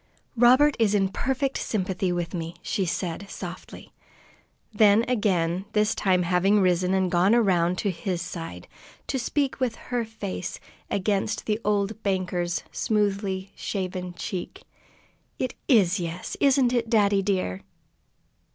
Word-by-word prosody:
"Robert 255 Hz, +5 st, +5 dB
is 210 Hz, -2 st, +3 dB
in 195 Hz, -2 st, +2 dB
perfect 265 Hz, +6 st, -1 dB
sympathy 190 Hz, -3 st, -1 dB
with 175 Hz, 0 st, -2 dB
me," 165 Hz, -1 st, -4 dB
she 195 Hz, -5 st, -1 dB
said 175 Hz, +3 st, -3 dB
softly. 180 Hz, -1 st, -9 dB, 0.8 s
Then 210 Hz, +1 st, +5 dB
again, 190 Hz, -6 st, +1 dB
this 210 Hz, +1 st, +2 dB
time 185 Hz, -2 st, +2 dB
having 185 Hz, +4 st, +3 dB
risen 185 Hz, 0 st, +2 dB
and 190 Hz, -2 st, +1 dB
gone 185 Hz, +5 st, +4 dB
around 180 Hz, -6 st, +2 dB
to 200 Hz, -, 0 dB
his 180 Hz, +1 st, -3 dB
side, 165 Hz, -, -7 dB, 0.4 s
to 265 Hz, -, -2 dB
speak 275 Hz, +2 st, -1 dB
with 250 Hz, -4 st, 0 dB
her 245 Hz, -1 st, -3 dB
face 210 Hz, -5 st, -5 dB, 0.3 s
against 200 Hz, +2 st, -1 dB
the 215 Hz, 0 st, 0 dB
old 210 Hz, +1 st, 0 dB
banker's 180 Hz, -3 st, -1 dB
smoothly 200 Hz, -2 st, -1 dB
shaven 185 Hz, -2 st, -4 dB
cheek, 180 Hz, +1 st, -6 dB, 0.7 s
"It 255 Hz, -, -2 dB
is 205 Hz, -6 st, +4 dB
'yes,' 170 Hz, +1 st, -4 dB
isn't 265 Hz, -3 st, +4 dB
it, 235 Hz, -2 st, 0 dB
daddy 205 Hz, -3 st, +3 dB
dear?" 185 Hz, -, -1 dB
195 Hz, 135 wpm, -25 LUFS, 180-220 Hz, 0.8 s, Robert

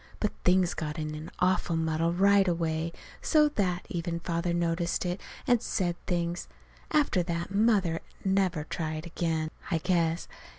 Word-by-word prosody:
But 210 Hz, -, 0 dB
things 180 Hz, -1 st, +4 dB
got 150 Hz, -2 st, -4 dB
in 155 Hz, -1 st, -3 dB
an 155 Hz, +1 st, -6 dB
awful 180 Hz, -2 st, +2 dB
muddle 160 Hz, +1 st, +1 dB
right 195 Hz, +2 st, +4 dB
away, 165 Hz, -1 st, 0 dB, 0.3 s
so 300 Hz, -2 st, +4 dB
that 185 Hz, -9 st, -1 dB
even 170 Hz, -1 st, -3 dB
Father 170 Hz, +1 st, -1 dB
noticed 170 Hz, +1 st, 0 dB
it 180 Hz, +2 st, -2 dB, 0.2 s
and 245 Hz, -5 st, +4 dB
said 175 Hz, -7 st, 0 dB
things. 175 Hz, -1 st, -1 dB, 0.4 s
After 290 Hz, -11 st, +3 dB
that 170 Hz, +1 st, -3 dB
Mother 200 Hz, -6 st, +3 dB, 0.3 s
never 190 Hz, -5 st, +2 dB
tried 155 Hz, 0 st, -4 dB
again, 160 Hz, -2 st, -1 dB, 0.2 s
I 165 Hz, -, +2 dB
guess. 170 Hz, -1 st, +1 dB
170 Hz, 145 wpm, -29 LUFS, 165-190 Hz, 0.4 s, things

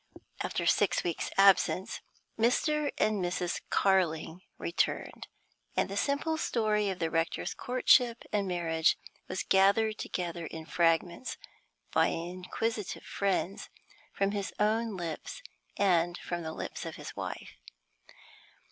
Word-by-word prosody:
After -, -, -2 dB
six -, -, +3 dB
weeks' 170 Hz, -2 st, -2 dB
absence 195 Hz, -1 st, +4 dB, 0.3 s
Mr. 290 Hz, +6 st, +2 dB
and 210 Hz, -3 st, +1 dB
Mrs. 175 Hz, 0 st, -1 dB
Carling 175 Hz, -3 st, +1 dB, 0.2 s
returned, 170 Hz, -, -1 dB, 0.5 s
and -, -, +2 dB
the 200 Hz, -, -4 dB
simple 285 Hz, +8 st, 0 dB
story 215 Hz, -7 st, +1 dB
of 190 Hz, -, -3 dB
the 165 Hz, -2 st, -1 dB
rector's 165 Hz, 0 st, -1 dB
courtship 245 Hz, -1 st, +3 dB
and 200 Hz, -2 st, +1 dB
marriage 165 Hz, -2 st, +2 dB, 0.3 s
was 185 Hz, -, -3 dB
gathered 200 Hz, +3 st, +3 dB
together 170 Hz, -2 st, -3 dB
in 160 Hz, -1 st, -8 dB
fragments, 170 Hz, +6 st, +1 dB, 0.6 s
by -, -, +4 dB
inquisitive 185 Hz, +5 st, -3 dB
friends, 195 Hz, -1 st, -1 dB, 0.4 s
from 195 Hz, 0 st, 0 dB
his 200 Hz, -1 st, -3 dB
own 215 Hz, 0 st, +1 dB
lips 165 Hz, -3 st, -5 dB, 0.3 s
and 175 Hz, -3 st, +3 dB
from 175 Hz, 0 st, -4 dB
the 160 Hz, -1 st, -5 dB
lips -, -, -5 dB
of -, -, -6 dB
his -, -, -8 dB
wife. -, -, -6 dB
190 Hz, 120 wpm, -30 LUFS, 170-215 Hz, 0.6 s, absence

